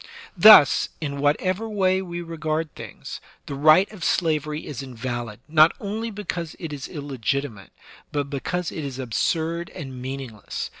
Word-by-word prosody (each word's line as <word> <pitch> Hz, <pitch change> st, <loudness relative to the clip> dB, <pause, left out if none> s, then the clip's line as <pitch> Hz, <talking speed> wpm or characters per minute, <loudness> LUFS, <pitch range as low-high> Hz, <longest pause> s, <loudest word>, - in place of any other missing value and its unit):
Thus, 185 Hz, -6 st, +8 dB
in 140 Hz, -3 st, -4 dB
whatever 185 Hz, +9 st, 0 dB
way 190 Hz, -3 st, +2 dB
we 175 Hz, -2 st, -5 dB
regard 160 Hz, -1 st, -3 dB
things, -, -, -9 dB, 0.2 s
the -, -, -6 dB
right 155 Hz, +7 st, +5 dB
of 205 Hz, -6 st, -9 dB
slavery 155 Hz, -3 st, 0 dB
is 140 Hz, -5 st, -6 dB
invalid, 120 Hz, -3 st, -5 dB
not 155 Hz, +1 st, +6 dB
only 220 Hz, +3 st, -3 dB
because 185 Hz, -6 st, -5 dB
it 165 Hz, -4 st, -6 dB
is 140 Hz, -2 st, -6 dB
illegitimate, 140 Hz, -, -3 dB, 0.4 s
but 145 Hz, -1 st, -1 dB
because 165 Hz, +5 st, -3 dB
it 160 Hz, -, -5 dB
is 135 Hz, -2 st, -5 dB
absurd 160 Hz, +7 st, -1 dB
and 130 Hz, -3 st, -8 dB
meaningless. 130 Hz, -5 st, -5 dB
155 Hz, 145 wpm, -24 LUFS, 135-175 Hz, 0.4 s, Thus